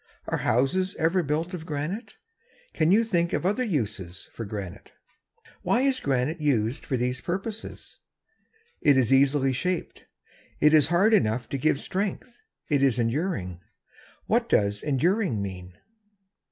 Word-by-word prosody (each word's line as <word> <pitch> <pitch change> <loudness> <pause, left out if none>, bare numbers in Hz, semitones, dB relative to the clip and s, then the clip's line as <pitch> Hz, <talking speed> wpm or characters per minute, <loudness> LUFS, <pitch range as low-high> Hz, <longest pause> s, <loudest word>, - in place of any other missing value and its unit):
Are - - -2
houses 180 - +1
ever 165 +3 +2
built 160 +4 -2
of 175 -3 -5
granite? 155 - -4 0.6
Can 160 +1 +2
you 220 +4 +5
think 175 -6 0
of - - -1
other 210 +7 +1
uses 105 - -4
of 115 - -5
granite? 100 -4 -7 0.7
Why 240 - +1
is 270 -1 +1
granite 140 +4 -1
used 125 -4 0
for 130 - 0
these 125 +1 -1
purposes? 200 +5 -6 0.8
It 145 -2 +5
is 130 -1 +3
easily 135 0 +3
shaped. 180 +7 -3 0.5
It 150 +1 +5
is 150 -3 +6
hard 185 +7 +3
enough 115 - +2
to 140 - -2
give 145 0 +2
strength. 200 +8 -4 0.3
It 145 -3 +1
is 135 -4 +3
enduring. 115 - -2 0.7
What - - +1
does 100 0 +2
"enduring" 165 - +1
mean? 90 -3 -7
145 Hz, 140 wpm, -26 LUFS, 120-180 Hz, 0.8 s, is